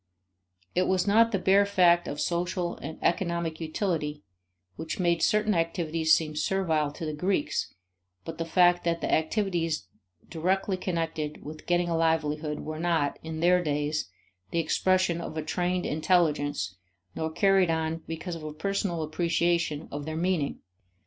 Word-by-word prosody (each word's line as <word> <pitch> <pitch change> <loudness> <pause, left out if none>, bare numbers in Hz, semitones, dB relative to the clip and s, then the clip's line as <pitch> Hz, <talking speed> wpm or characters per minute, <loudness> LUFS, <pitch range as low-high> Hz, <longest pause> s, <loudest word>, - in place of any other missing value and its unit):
It 185 - +2
was 185 -1 +2
not 225 +3 +4
the 200 - +1
bare 195 +2 +4
fact 180 -3 +4
of 145 - -4
social 175 +2 -1
and 160 +2 -7
economic 170 -2 0
utility 155 -3 -2 0.5
which 160 - -5
made 170 -2 +2
certain 210 0 +3
activities 165 -2 +2
seem 155 -2 -4
servile 155 -2 0
to 160 - -6
the 155 - -3
Greeks 150 - -1 0.5
but 165 0 -7
the 165 - -1
fact 175 +1 +4
that 170 -1 0
the - - 0
activities 165 - 0 0.4
directly 185 +4 0
connected 165 -4 -3
with 155 +1 -9
getting 175 0 +2
a 170 - 0
livelihood 155 -2 0
were 155 0 -5
not, 165 -4 0
in 160 0 -5
their 180 +1 +4
days, 150 - -1 0.4
the - - -3
expression 170 +1 +2
of 160 - -6
a 155 - -2
trained 180 +2 -1
intelligence 150 - +1 0.4
nor 160 0 -2
carried 195 +1 +3
on 160 0 -1
because 165 +2 -5
of 165 - -6
a 155 -1 -5
personal 175 0 -2
appreciation 165 -1 0
of 145 0 -5
their 160 0 -3
meaning. 170 -4 -1
165 Hz, 155 wpm, -28 LUFS, 155-180 Hz, 0.5 s, not